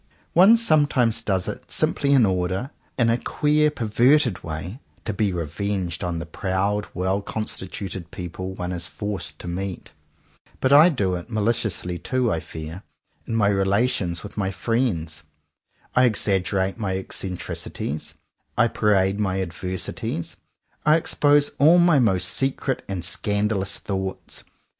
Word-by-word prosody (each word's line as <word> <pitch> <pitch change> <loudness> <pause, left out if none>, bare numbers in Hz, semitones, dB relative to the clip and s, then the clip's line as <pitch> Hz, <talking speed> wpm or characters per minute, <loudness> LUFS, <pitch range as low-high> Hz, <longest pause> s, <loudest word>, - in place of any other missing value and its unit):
One 195 +7 +7
some 155 -10 +4
times 115 -4 +1
does 95 -5 0
it - - -6
simply 140 - +1
in 135 -5 +6
order, 95 +7 -1 0.3
in 115 -2 +3
a 120 - +1
queer 150 +3 +2
perverted 120 -2 +2
way, 80 +8 -6 0.3
to 110 - -2
be 100 0 +1
revenged 90 +2 -3
on 85 -1 -2
the 80 - -4
proud, 100 +5 -1
well 95 +2 0
constituted 95 -4 -5
people 95 +1 -6
one 90 -1 -4
is 85 -2 -3
forced 95 -7 -5
to - - -9
meet. 95 +1 -5 0.7
But 130 +1 +3
I 155 +5 +9
do 100 - 0
it, 85 -1 -5
maliciously 105 -5 -1
too, 130 -3 0
I 80 - 0
fear, 80 +3 -8 0.5
in 115 - -2
my 105 -3 +3
relations 95 -3 +1
with 105 - -10
my 95 -2 0
friends. 95 -8 -1 0.7
I 125 0 +6
exag 100 -4 +1
gerate 95 +1 -1
my 95 -3 -1
eccentricities; 90 -5 -5 0.4
I 115 - +4
parade 100 -2 +2
my 95 -2 0
ad 95 -3 -2
versities; 90 +1 -4 0.5
I 150 +1 +5
expose 145 -2 +3
all 160 +5 +7
my 170 -4 +5
most 95 -7 +2
secret 135 +5 -1
and 90 -3 -3
scandalous 100 +1 0
thoughts. 95 -1 -5
100 Hz, 145 wpm, -23 LUFS, 90-120 Hz, 0.7 s, I